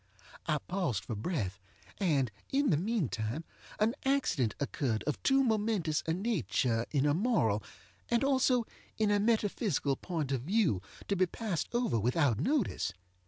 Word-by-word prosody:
I 155 -2 +2
paused 145 - -2
for - - -4
breath; 105 - -2 0.4
and, 145 - +2 0.2
in 275 -3 +3
the 150 - +4
meantime, 155 - -1 0.4
an 215 +2 +3
accident 255 - +1
occurred 130 -5 -1
of 150 - -2
too 270 0 +4
momentous 210 - +1
a 160 - +2
nature 130 - 0
in 140 -2 +1
a 145 - +3
moral, 150 - +2 0.5
and 235 +2 +2
also 260 -3 +3 0.3
in 215 -1 +2
a 205 - +3
metaphysical 205 - +1
point 155 -3 -3
of 130 -3 0
view, 170 - +2 0.3
to 200 - +1
be 185 0 +3
passed 185 -4 -3
over 240 - +1
without 125 +1 +2
notice. 235 - 0
170 Hz, 150 wpm, -32 LUFS, -, 0.5 s, the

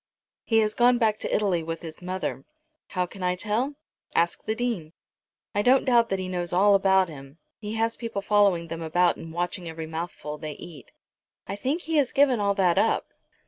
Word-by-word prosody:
"He 225 - +2
has 215 0 0
gone 245 +1 +4
back 220 -3 +1
to - - -3
Italy 195 -5 +1
with 165 +1 -5
his 160 0 -8
mother. 185 +1 -4 0.4
How 180 -1 -1
can 190 +2 -12
I 180 0 +1
tell? 225 +9 -1 0.4
Ask 170 +1 +1
the 220 - -1
Dean. 225 -10 -3 0.6
I 205 - +1
don't 255 +4 +4
doubt 235 -2 +4
that 195 - 0
he 185 -1 -4
knows 175 -2 -1
all 200 +3 +5
about 190 -1 +4
him. 140 -2 -11 0.2
He 215 0 -5
has 225 +1 0
people 230 -4 -4
following 200 -5 +3
them 165 0 -5
about, 175 +2 +2
and 165 - -9
watching 175 +1 -3
every 160 0 -6
mouthful 160 -2 -6
they 155 -1 -5
eat." 150 -4 -12 0.5
"I 195 - -4
think 270 - -2
he 325 -2 -1
has 275 -4 +2
given 270 -4 +4
all 200 -1 +1
that 180 -4 +3
up." - - +1
190 Hz, 200 wpm, -26 LUFS, 170-225 Hz, 0.6 s, all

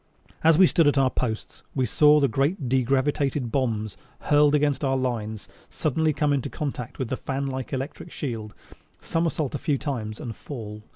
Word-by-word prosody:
As 160 -1 +6
we 190 - +8
stood 165 -3 +3
at 145 - +3
our 135 -2 +3
posts, 110 -3 -3
we 130 -2 +2
saw 150 +7 +5
the 140 - +3
great 135 - 0
degravitated 135 0 +1
bombs 110 -6 -1 0.2
hurtled 150 0 +4
against 145 0 +1
our 135 -1 +2
lines 110 -4 -3 0.2
suddenly 155 +2 0
come 150 -1 +1
into 135 -3 -1
contact 130 -5 -5
with 130 -4 -3
the 130 - -2
fan 135 0 -3
like 130 -1 -4
electric 140 +5 -5
field, 110 -7 -5 0.4
somersault 165 -4 -1
a 145 - -2
few 145 -4 0
times 120 -7 -4
and 115 -3 -6
fall. 105 -6 -8
135 Hz, 175 wpm, -25 LUFS, 120-150 Hz, 0.4 s, we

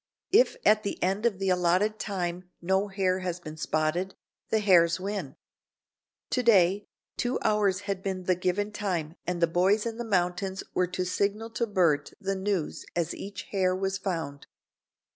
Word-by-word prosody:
If 470 +6 +5
at 215 0 +5
the 200 - -3
end 195 +5 +2
of 210 -5 -2
the 195 0 -1
allotted 185 +4 +2
time 180 -2 -3
no 190 +3 +1
hare 190 -2 0
has 180 -1 -3
been 155 -3 -8
spotted, 155 +4 -1 0.3
the 220 - +2
hares 180 -5 +4
win. 190 -7 -4 1.0
To 250 - +2
day 200 -4 +4 0.3
two 245 +1 0
hours 205 -3 +2
had 200 -2 -3
been 190 -1 -3
the 185 - +3
given 185 +4 -1
time 175 -7 -2
and 175 -1 -1
the - - +9
boys 185 +6 +2
in 230 -1 -3
the 240 - -3
mountains 190 -2 -1
were 180 - +2
to 185 +1 -2
signal 205 +5 -1
to 235 +1 -1
Bert 170 -8 +2
the 195 0 -1
news 190 -4 -2
as 170 -2 0
each 195 -1 -7
hare 185 -2 +2
was 195 +1 -2
found. 165 -7 -4
190 Hz, 170 wpm, -28 LUFS, 175-205 Hz, 1.0 s, the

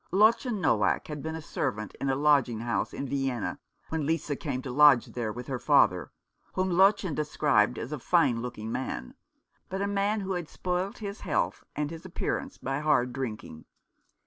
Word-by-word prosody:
Lottchen 220 +3 +3
Noack 110 - +2
had 150 -1 -5
been 160 +2 -4
a 160 - -6
servant 110 -7 -3
in 135 - 0
a 135 - +2
lodging 135 -6 +3
house 120 0 -1
in 140 - -4
Vienna 135 -4 -2 0.3
when 160 -1 -1
Lisa 160 -2 0
came 140 -4 -3
to 130 - -5
lodge 145 -2 +6
there 115 -3 -2
with 125 +3 -7
her 130 -1 -3
father, 90 - +3 0.4
whom 185 0 0
Lottchen 190 -1 +4
described 145 -4 +2
as 115 - -5
a 150 - -3
fine 135 -6 +2
looking 115 -2 -5
man, 65 - -4 0.6
but 190 - -3
a 200 - 0
man 200 +1 0
who 195 0 -4
had 175 -3 -4
spoilt 180 +2 -2
his 200 -1 -6
health 175 - -1
and 150 0 -2
his 165 0 -8
appearance 190 +8 -3
by 135 +1 -2
hard 145 -5 +2
drinking. 110 -11 -6
145 Hz, 180 wpm, -28 LUFS, 125-180 Hz, 0.6 s, lodge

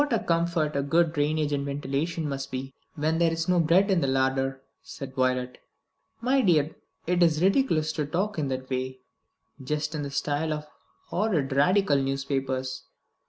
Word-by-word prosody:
"What 290 -3 0
a - - +4
comfort 170 -4 0 0.2
good 165 0 +3
drainage 150 0 0
and 140 -1 0
ventilation 145 +3 -2
must 140 -1 -4
be, 130 0 -5 0.2
when 160 +2 0
there 170 -1 +3
is 165 0 -2
no 180 -1 +3
bread 175 +5 +4
in 185 -3 +3
the 140 - +1
larder!" 135 0 0 0.2
said 135 -1 -8
Violet. 125 -1 0 0.6
"My 260 +3 +3
dear, 160 - +2 0.3
it 180 +1 +1
is 165 -1 +3
ridiculous 185 - +2
to 150 -2 -2
talk 185 +4 -1
in 145 - 0
that 130 0 -4
way; 130 0 -3 0.6
just 150 +3 -2
in 150 - -3
the 140 - -4
style 145 +3 -1
of 150 0 -5 0.4
horrid 165 -11 0
Radical 150 +2 +3
newspapers. 135 -1 -2
150 Hz, 165 wpm, -27 LUFS, 135-170 Hz, 0.6 s, a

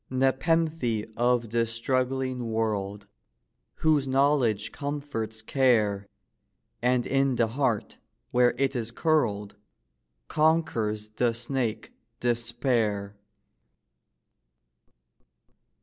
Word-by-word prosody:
Nepenthe 135 -3 +1
of 120 -2 +1
this 115 -1 +1
struggling 130 0 -1
world, 105 -2 -2 0.7
Whose 150 -4 +2
knowledge 130 -6 +2
comforts 140 -7 -4
care, 110 -7 +2 0.7
And 125 0 +2
in 135 -1 +2
the 115 -2 +2
heart, 120 -3 -1 0.3
where 125 0 +4
it 135 0 0
is 115 -2 -2
curled, 115 -8 0 0.7
Conquers 135 -10 +1
the 115 +1 0
snake, 120 -1 -3 0.3
despair. 115 -4 0
120 Hz, 80 wpm, -27 LUFS, 110-135 Hz, 0.7 s, where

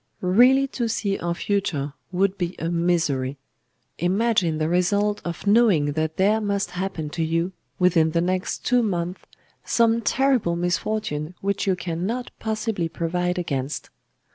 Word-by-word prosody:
Really 250 +9 +5
to 240 -3 -2
see 205 -3 -1
our 170 0 -2
future 165 -9 -1 0.2
would 190 +1 +1
be 180 -2 -3
a 165 - -2
misery. 165 -6 0 0.6
Imagine 185 -2 +2
the 155 0 0
result 200 +4 +1
of 170 +2 -5
knowing 200 -9 +4
that 160 +1 -2
there 210 +3 +3
must 200 -3 -1
happen 180 -4 -4
to 165 - -2
you, 165 +3 0 0.3
within 170 -3 +4
the 170 +1 0
next 185 +2 -1
two 250 -1 +3
months, 180 -4 -2 0.4
some 230 0 +2
terrible 250 -6 +2
misfortune 175 -2 -2
which 200 +1 -1
you 190 - +3
cannot 185 +8 -3
possibly 215 -5 -2
provide 180 +2 -1
against! 140 -5 -3
180 Hz, 140 wpm, -24 LUFS, 165-210 Hz, 0.6 s, Really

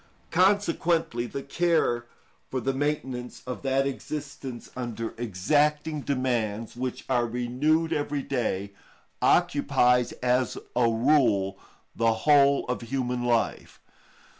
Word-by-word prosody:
Consequently 170 - +2
the 135 +3 -6
care 140 -7 +1 0.4
for 130 - -2
the 135 +3 -1
maintenance 130 -3 -3
of 125 -1 -5
that 135 0 +1
existence 140 -2 -6
under 115 -3 -4
exacting 145 - 0
demands, 120 -6 -1
which 125 0 -4
are 120 -2 +1
renewed 135 +8 0
every 145 -2 -2
day, 100 -7 -2 0.5
occupies, 125 0 +3
as 125 -1 0 0.2
a 120 -1 +4
rule, 115 -6 +2 0.4
the 115 -1 +3
whole 140 +3 +4
of 125 0 -3
human 125 0 -2
life. 120 -2 -1
125 Hz, 110 wpm, -27 LUFS, 120-145 Hz, 0.5 s, a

